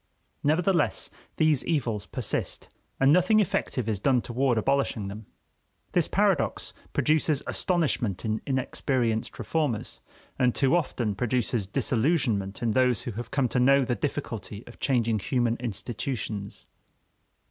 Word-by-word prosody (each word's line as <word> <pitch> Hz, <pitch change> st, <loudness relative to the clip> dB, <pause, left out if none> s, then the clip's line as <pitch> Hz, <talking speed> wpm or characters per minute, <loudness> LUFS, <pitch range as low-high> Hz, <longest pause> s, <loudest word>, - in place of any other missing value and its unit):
Nevertheless, 165 Hz, +3 st, +1 dB, 0.3 s
these 155 Hz, -4 st, +3 dB
evils 115 Hz, -, -1 dB
persist, -, -, -4 dB, 0.3 s
and 135 Hz, +2 st, +5 dB
nothing 185 Hz, +5 st, +4 dB
effective 130 Hz, -, 0 dB
is 105 Hz, -3 st, -1 dB
done 130 Hz, +4 st, +3 dB
toward 125 Hz, 0 st, +1 dB
abolishing 120 Hz, -4 st, 0 dB
them. 105 Hz, +1 st, -9 dB, 0.6 s
This -, -, +2 dB
paradox -, -, +1 dB, 0.2 s
produces 155 Hz, -2 st, +2 dB
astonishment 140 Hz, -, 0 dB
in 110 Hz, 0 st, -1 dB
inexperienced 130 Hz, -3 st, -1 dB
reformers, 150 Hz, -9 st, -2 dB, 0.4 s
and 125 Hz, -2 st, +3 dB
too 135 Hz, +3 st, +3 dB
often 125 Hz, -10 st, 0 dB
produces 120 Hz, -1 st, -1 dB
disillusionment 115 Hz, -, 0 dB
in 115 Hz, -, +2 dB
those 125 Hz, 0 st, +2 dB
who 120 Hz, -, -4 dB
have 115 Hz, +2 st, -6 dB
come 140 Hz, -2 st, +1 dB
to 125 Hz, -, 0 dB
know 135 Hz, +2 st, +5 dB
the 125 Hz, -, 0 dB
difficulty 120 Hz, -6 st, -4 dB
of 120 Hz, -, -14 dB
changing 115 Hz, -5 st, +1 dB
human 120 Hz, +2 st, 0 dB
institutions. 115 Hz, -2 st, -4 dB
125 Hz, 125 wpm, -27 LUFS, 110-140 Hz, 0.6 s, and